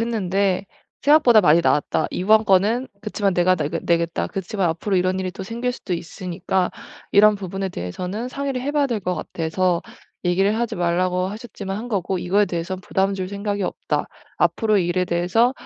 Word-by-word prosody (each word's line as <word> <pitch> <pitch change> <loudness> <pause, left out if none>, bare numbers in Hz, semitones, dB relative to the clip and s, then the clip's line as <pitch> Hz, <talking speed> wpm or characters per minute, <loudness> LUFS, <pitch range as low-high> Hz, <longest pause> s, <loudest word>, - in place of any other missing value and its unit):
했는데 200 -4 0 0.4
생각보다 275 -6 +6
많이 170 -3 +5
나왔다. 155 -1 +1
이번 215 +4 +3
건은 210 +6 +3
그치만 205 -2 -1
내가 180 +1 +4
내게 165 +2 -2
내겠다. 170 -1 0
그치만 190 -1 -2
앞으로 180 +5 -1
이런 185 +1 +1
일이 185 -1 -2
또 190 - -7
생길 235 +4 -3
수도 195 -6 -6
있으니까 180 +2 -2 0.4
이런 210 +1 +6
부분에 195 -1 -4
대해서는 180 - -4
상의를 275 -1 -3
해 275 +3 -2
봐야 290 -1 +2
될 235 -5 -2
것 180 -1 -1
같아서 170 +2 -1 0.4
얘기를 195 +4 +2
하지 235 0 -2
말라고 180 +1 +1
하셨지만 200 -2 -6
한 230 +4 -6
거고 190 -4 -1
이거에 195 +4 +2
대해선 175 +1 -4
부담 195 +1 0
줄 185 -1 -4
생각이 200 0 -3
없다. - - -2 0.3
앞으로 215 -2 +2
이 175 - +1
일에 180 +1 +1
대해서 180 +8 +2
190 Hz, 395 characters per minute, -22 LUFS, 180-215 Hz, 0.4 s, 생각보다